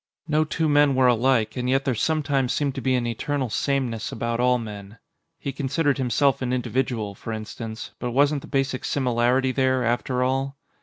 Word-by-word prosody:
No 155 0 +2
two 160 +1 -1
men 145 -2 +4
were 130 0 +4
alike, 120 -1 +3
and 125 -1 -2
yet 135 +1 +2
there 135 - +1
sometimes 140 0 0
seemed 140 -2 0
to - - -5
be 130 -1 +2
an 125 -1 0
eternal 130 +2 -2
sameness 130 -5 -1
about 115 0 -2
all 125 0 +3
men. 105 -2 -8 0.4
He 140 - -4
considered 140 +1 0
himself 135 +2 +2
an 125 -1 -1
individual, 125 -4 -1
for 115 - -7
instance, 110 +1 -6
but 125 - -2
wasn't 140 +3 +2
the - - -11
basic 135 -2 -1
similarity 130 0 +1
there, 130 -1 +1
after 125 +2 0
all? 135 +2 -1
130 Hz, 185 wpm, -24 LUFS, 120-140 Hz, 0.4 s, men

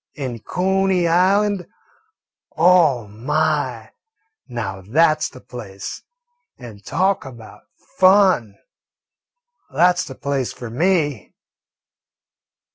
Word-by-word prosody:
An' 130 -5 -5
Cooney 190 - 0
Island 190 +2 +2 0.9
oh, 160 -8 +4
my, 125 +10 -2 0.6
now 110 -6 -5
that 155 - +2
's - - -1
the 130 - -14
place; 100 -6 -8 0.6
and 110 -5 -12
talk 190 - 0
about 120 -5 -13 0.3
fun! 185 - +4 1.1
That 175 +6 +3
's - - -1
the 135 - -9
place 140 -3 -2
for 120 -2 -9
me." 150 - -1
150 Hz, 95 wpm, -20 LUFS, 120-180 Hz, 1.1 s, oh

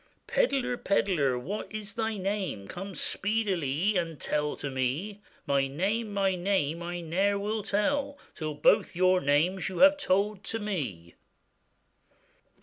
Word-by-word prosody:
'Pedlar, 270 - +1
pedlar! 170 - +1
what 185 +13 -5
is 215 -1 -5
thy 225 -1 -2
name? 190 - -3
Come 195 - -7
speedilie 195 -4 0
and 165 -3 -2
tell 150 0 -1
to 140 - -5
me.' 145 +11 -2 0.2
'My 140 -1 +2
name! 205 +10 -1
my 195 -1 +1
name, 175 -4 0
I 175 0 -4
ne'er 190 +5 +1
will 210 +2 -2
tell, 280 +8 0 0.2
Till 155 -2 -4
both 145 - +3
your 185 +1 +4
names 160 +8 +2
you 185 - -6
have 290 0 +5
told 205 -4 0
to 225 - -2
me. 135 - -4
190 Hz, 140 wpm, -29 LUFS, 155-210 Hz, 0.2 s, have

